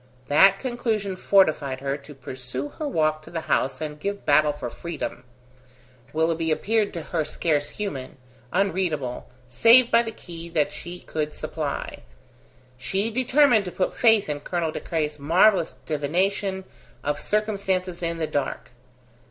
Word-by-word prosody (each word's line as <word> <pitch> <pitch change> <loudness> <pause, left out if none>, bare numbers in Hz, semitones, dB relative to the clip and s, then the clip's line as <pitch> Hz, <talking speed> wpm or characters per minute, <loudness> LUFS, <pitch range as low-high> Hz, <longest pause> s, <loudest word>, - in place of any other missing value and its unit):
That 195 +7 +6
conclusion 220 -5 -2
fortified 155 -9 +2
her 135 +1 -2
to 145 +1 -12
pursue 130 +1 -6
her 305 - -5
walk 155 - +1
to - - -13
the 165 -1 -4
house 130 -3 0
and 150 -1 -5
give 200 +5 -4
battle 150 +1 +4
for 145 -5 -6
freedom. 165 -7 -5 0.9
Willoughby 160 +1 0
appeared 210 +6 +1
to 165 - -4
her 165 -1 -1
scarce 150 -1 0
human, 145 -14 -5 0.3
unreadable, 180 -9 -1 0.2
save 230 - +6
by 230 - +6
the 230 - -4
key 170 -4 -9
that 155 -3 0
she 175 +1 -8
could 150 -1 -3
supply. 155 -2 -4 0.8
She 195 - -1
determined 255 -2 +4
to 180 - -5
put 185 - -1
faith 225 -3 +4
in 150 -1 -2
Colonel 165 +1 -2
De - - -4
Craye's 150 -3 -2
marvellous 170 +4 +4
divination 190 +6 -1 0.4
of 145 0 -1
circumstances 195 -4 -1
in 170 -1 -2
the 160 - -1
dark. 145 -4 -3
165 Hz, 145 wpm, -25 LUFS, 150-200 Hz, 0.9 s, That